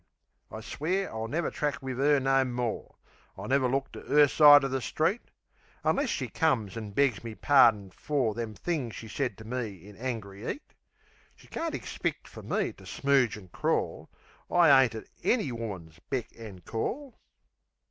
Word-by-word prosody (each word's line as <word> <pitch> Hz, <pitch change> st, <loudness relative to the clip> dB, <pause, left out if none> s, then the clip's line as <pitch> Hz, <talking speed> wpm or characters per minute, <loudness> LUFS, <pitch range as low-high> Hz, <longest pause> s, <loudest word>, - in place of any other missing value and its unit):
I 110 Hz, -, -7 dB
swear 180 Hz, -, -2 dB
I'll 110 Hz, 0 st, -3 dB
never 160 Hz, +7 st, -1 dB
track 145 Hz, -2 st, -2 dB
wiv 130 Hz, -1 st, -4 dB
'er 145 Hz, +1 st, +4 dB
no 135 Hz, 0 st, +3 dB
more; 125 Hz, -2 st, -3 dB, 0.4 s
I'll -, -, -7 dB
never 135 Hz, -1 st, +2 dB
look 135 Hz, +1 st, -1 dB
on -, -, -8 dB
'er 145 Hz, 0 st, +7 dB
side 145 Hz, 0 st, +8 dB
o' -, -, +1 dB
the 135 Hz, 0 st, -2 dB
street 165 Hz, -, 0 dB, 0.6 s
Unless -, -, +1 dB
she -, -, -2 dB
comes 125 Hz, -, 0 dB
an' 110 Hz, -2 st, -5 dB
begs 120 Hz, 0 st, +1 dB
me 115 Hz, -2 st, -7 dB
pardin 110 Hz, -9 st, +4 dB
for 130 Hz, -1 st, -1 dB
Them 115 Hz, -1 st, -5 dB
things 140 Hz, -, -3 dB
she 115 Hz, -, -8 dB
said 120 Hz, -1 st, -3 dB
to 110 Hz, -, -11 dB
me 110 Hz, -6 st, -5 dB
in 105 Hz, -, -13 dB
angry 110 Hz, -4 st, -5 dB
'eat. 295 Hz, -, -11 dB, 0.6 s
She -, -, -19 dB
can't 330 Hz, -1 st, -3 dB
ixpeck -, -, -4 dB
fer -, -, -11 dB
me -, -, -1 dB
to -, -, -17 dB
smooge 135 Hz, -6 st, +1 dB
an' 95 Hz, -3 st, -13 dB
crawl. -, -, -2 dB, 0.4 s
I 160 Hz, -6 st, +6 dB
ain't 115 Hz, -, -5 dB
at 110 Hz, -, -7 dB, 0.2 s
ANY 215 Hz, -, +1 dB
woman's 95 Hz, -9 st, -7 dB
beck 130 Hz, -4 st, -2 dB
an' 105 Hz, -5 st, -10 dB
call. 250 Hz, -, -4 dB
125 Hz, 175 wpm, -29 LUFS, 110-145 Hz, 0.6 s, side